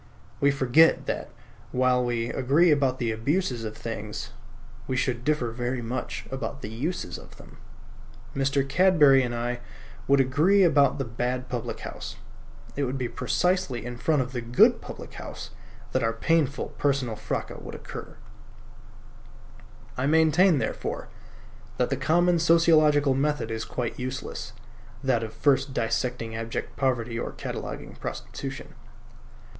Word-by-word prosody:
We 140 - +4
forget 140 +3 +4
that, - - -3 0.4
while 125 0 +3
we 120 -1 -1
agree 150 +7 +3
about 135 -3 +2
the 120 -3 -1
abuses 125 +2 -1
of 110 -1 -5
things, 110 -2 -5 0.6
we 130 - -1
should 125 -2 -1
differ 145 -5 0
very 120 +1 -3
much 125 +3 -4
about 135 +1 -5
the 105 - -5
uses 120 - -3
of - - -15
them. - - -15 0.8
Mr. 135 0 +1
Cadbury 150 -4 +5
and 120 -2 -2
I 120 +1 -2 0.5
would 140 0 +5
agree 155 +10 +4
about 145 -5 +4
the 135 - -2
bad 125 +2 -3
public 120 -1 -4
house. 115 - -7 0.6
It 140 - 0
would 130 +1 -2
be 125 -2 -1
precisely 130 +2 0
in 120 0 -5
front 145 +2 +1
of 125 - -9
the 125 -2 -3
good 120 +1 +4
public - - -9
house - - -8 0.4
that 130 - +1
our 115 0 +1
painful 145 +3 +1
personal 135 -5 +1
fracas 110 0 -4
would - - -8
occur. - - -9 1.8
I 130 +2 0
maintain, 160 +3 +5
therefore, - - -3 0.7
that - - +1
the - - +2
common 175 +1 +3
sociological 155 -4 +5
method 140 -3 0
is 110 0 -3
quite 125 0 -4
useless: 130 +1 -5 0.5
that 130 -4 +2
of 110 -1 -4
first 135 0 +1
dissecting 115 0 -1
abject 115 0 -4
poverty 120 -3 0
or - - -4
cataloguing - - -6
prostitution. - - -6
130 Hz, 140 wpm, -26 LUFS, 120-145 Hz, 1.8 s, Cadbury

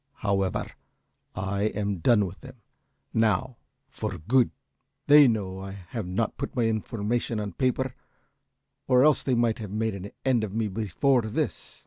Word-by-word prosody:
However, 95 -2 +1 0.7
I 100 +2 -1
am 100 -2 -1
done 105 +3 +4
with 95 +1 -9
them, 130 -2 -12 0.5
now, 115 +3 +1 0.3
for 110 -8 -5
good. 120 +10 +3 0.6
They 145 -1 +8
know 100 -5 -1
that 95 - -6
I - - -6 0.2
have 110 -3 -4
not 95 +5 -1
put 140 - -5
my 120 - +2
information 115 +1 -1
on 100 -3 -4
paper, 130 +2 0 0.9
or 125 0 +5
else 150 -1 +4
they 130 - 0
might 115 -1 +1
have 105 -3 -6
made 110 +2 -1
an 100 +1 -6 0.2
end 125 -4 +3
of 105 -1 -4
me 110 -2 0
before 115 +6 +1
this." 110 -1 -4
110 Hz, 160 wpm, -27 LUFS, 100-125 Hz, 0.9 s, They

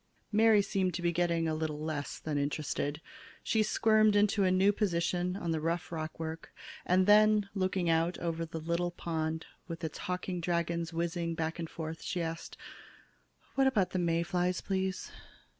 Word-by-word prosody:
Mary 215 -1 +5
seemed 185 -3 0
to 175 - -3
be 170 - +3
getting 170 -1 +1
a 160 - 0
little 155 -1 -2
less 155 -2 -3
than 155 -2 -4
interested. 145 +1 -2 0.4
She 220 - +2
squirmed 215 0 +4
into 205 0 +3
a 185 - +4
new 190 +2 +4
position 180 -2 0
on 175 -4 -2
the 160 -1 -1
rough 165 +1 -2
rockwork 160 0 -5 0.4
and 185 +1 +4
then, 210 0 +5
looking 185 -2 0
out 165 +2 +2
over 165 -1 -2
the 165 0 -5
little 170 +2 -1
pond 160 -2 -3 0.2
with 165 -1 -7
its 160 - -4
hawking 180 0 -3
dragons 170 0 -1
whizzing 170 0 -2
back 160 +1 -2
and 165 -1 -4
forth, 160 0 -6
she 180 - -3
asked: 165 -1 -4 1.0
"What 270 0 +3
about 210 -8 +2
the 185 - -1
May 170 -1 +1
flies, 180 0 0
please?" 190 -1 -2
170 Hz, 170 wpm, -31 LUFS, 165-190 Hz, 1.0 s, Mary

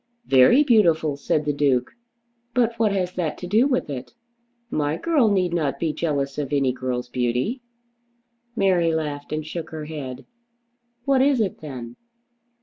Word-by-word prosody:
"Very 135 - +6
beautiful," 170 - +3
said 150 +2 -1
the 145 - 0
Duke. 135 -3 +1 0.6
"But 235 -2 +2
what 220 -2 +3
has 185 -2 -1
that 170 -4 -2
to - - -7
do 215 +8 +3
with 255 -3 0
it? 140 - -7 0.6
My 150 +1 0
girl 295 - +2
need 185 -4 +1
not 145 -5 0
be 160 -2 -1
jealous 140 -4 -2
of 140 -2 -3
any 135 -3 +2
girl's 125 -1 -3
beauty." 125 - -1 0.9
Mary 175 -6 +2
laughed 145 -2 -4
and 155 0 -3
shook 160 +1 -6
her 155 -1 -6
head. 135 -4 -7 0.8
"What 275 -2 +3
is 275 -2 +3
it, 205 -4 -1
then?" 125 -6 -8
155 Hz, 155 wpm, -23 LUFS, 140-195 Hz, 0.9 s, Very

